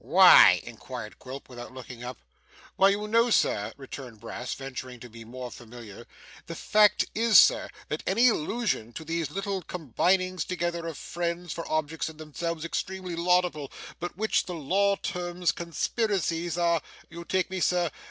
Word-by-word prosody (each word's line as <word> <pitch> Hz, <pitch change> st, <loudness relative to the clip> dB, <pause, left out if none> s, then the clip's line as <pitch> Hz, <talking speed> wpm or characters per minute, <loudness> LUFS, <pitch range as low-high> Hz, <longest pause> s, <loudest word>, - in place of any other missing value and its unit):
'Why?' -, -, +8 dB
inquired -, -, -8 dB
Quilp, 130 Hz, +2 st, -9 dB
without 120 Hz, 0 st, -10 dB
looking 125 Hz, -2 st, -9 dB
up. 125 Hz, 0 st, -6 dB, 0.6 s
'Why, 195 Hz, -, +5 dB
you 205 Hz, +1 st, -1 dB
know, 230 Hz, +2 st, +3 dB
sir,' 105 Hz, -, +2 dB
returned 130 Hz, -4 st, -9 dB
Brass, 115 Hz, +3 st, -5 dB
venturing 130 Hz, -2 st, -7 dB
to 125 Hz, -, -11 dB
be 115 Hz, 0 st, -11 dB
more 125 Hz, +2 st, -8 dB
familiar: 115 Hz, -3 st, -11 dB, 0.2 s
' -, -, -19 dB
the -, -, -6 dB
fact 210 Hz, -1 st, +4 dB
is, 225 Hz, -2 st, +5 dB
sir, -, -, +6 dB, 0.2 s
that 150 Hz, -, -3 dB
any 230 Hz, +6 st, +4 dB
allusion 210 Hz, -, -1 dB
to 160 Hz, -, -8 dB
these 165 Hz, 0 st, -2 dB
little 195 Hz, -1 st, -3 dB
combinings 180 Hz, +3 st, 0 dB
together, 175 Hz, -2 st, -3 dB
of 165 Hz, -, -6 dB
friends, 175 Hz, 0 st, -4 dB
for 165 Hz, -, -6 dB
objects 155 Hz, +1 st, -1 dB
in 160 Hz, -, -12 dB
themselves 160 Hz, +1 st, -4 dB
extremely 185 Hz, +1 st, -4 dB
laudable, 175 Hz, -4 st, +1 dB, 0.3 s
but 175 Hz, 0 st, -5 dB
which 220 Hz, +2 st, +1 dB
the 180 Hz, -, -4 dB
law 195 Hz, +6 st, +2 dB
terms 175 Hz, -3 st, -2 dB
conspiracies, 170 Hz, -1 st, -1 dB
are 170 Hz, -2 st, +2 dB, 0.3 s
you 170 Hz, +1 st, -8 dB
take 185 Hz, +2 st, -1 dB
me, 190 Hz, -, -2 dB
sir? 175 Hz, -2 st, +1 dB
170 Hz, 160 wpm, -27 LUFS, 135-185 Hz, 0.6 s, Why